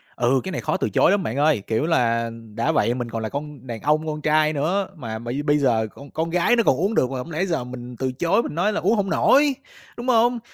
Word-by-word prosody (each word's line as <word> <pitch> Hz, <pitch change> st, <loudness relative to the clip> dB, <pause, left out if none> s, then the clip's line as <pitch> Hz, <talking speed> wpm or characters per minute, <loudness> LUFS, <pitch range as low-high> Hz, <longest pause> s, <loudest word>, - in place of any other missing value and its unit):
Ừ, 125 Hz, +2 st, +2 dB
cái 190 Hz, -, -5 dB
này -, -, -3 dB
khó 155 Hz, -, -1 dB
từ 110 Hz, -, -1 dB
chối 135 Hz, -, +3 dB
lắm 200 Hz, -2 st, +1 dB
bạn 120 Hz, +5 st, -3 dB
ơi, 150 Hz, -6 st, +3 dB
kiểu 115 Hz, +7 st, 0 dB
là, 115 Hz, -8 st, +1 dB, 0.3 s
đã 115 Hz, -, +1 dB
vậy 115 Hz, +3 st, +2 dB
mình 120 Hz, -1 st, -4 dB
còn 115 Hz, 0 st, -4 dB
là 110 Hz, -, -3 dB
con 145 Hz, -1 st, -7 dB
đàn 115 Hz, -2 st, -6 dB
ông 155 Hz, +1 st, +1 dB
con 150 Hz, -1 st, -4 dB
trai 155 Hz, 0 st, +2 dB
nữa, 180 Hz, +7 st, 0 dB
mà 110 Hz, -6 st, -6 dB
bây 120 Hz, +5 st, -4 dB
bây 145 Hz, 0 st, +3 dB
giờ 115 Hz, -6 st, +1 dB
con 140 Hz, 0 st, -13 dB
con 165 Hz, +1 st, -2 dB
gái 180 Hz, +8 st, +2 dB
nó 230 Hz, -, +3 dB
còn 135 Hz, -, +3 dB
uống 195 Hz, -, -1 dB
được 130 Hz, -, +2 dB
mà 135 Hz, -, -3 dB
hông 145 Hz, +7 st, -6 dB
lẽ 170 Hz, +5 st, -1 dB
giờ 165 Hz, -8 st, -1 dB
mình 125 Hz, 0 st, -8 dB
từ 130 Hz, -1 st, -1 dB
chối 175 Hz, -, +1 dB
mình -, -, -6 dB
nói 205 Hz, +6 st, +1 dB
là -, -, -1 dB
uống 210 Hz, +5 st, +2 dB
hổng 200 Hz, -2 st, -1 dB
nổi, 285 Hz, 0 st, +4 dB, 0.4 s
đúng 240 Hz, +1 st, -6 dB
hông? 240 Hz, 0 st, +3 dB
150 Hz, 275 wpm, -22 LUFS, 125-180 Hz, 0.4 s, nổi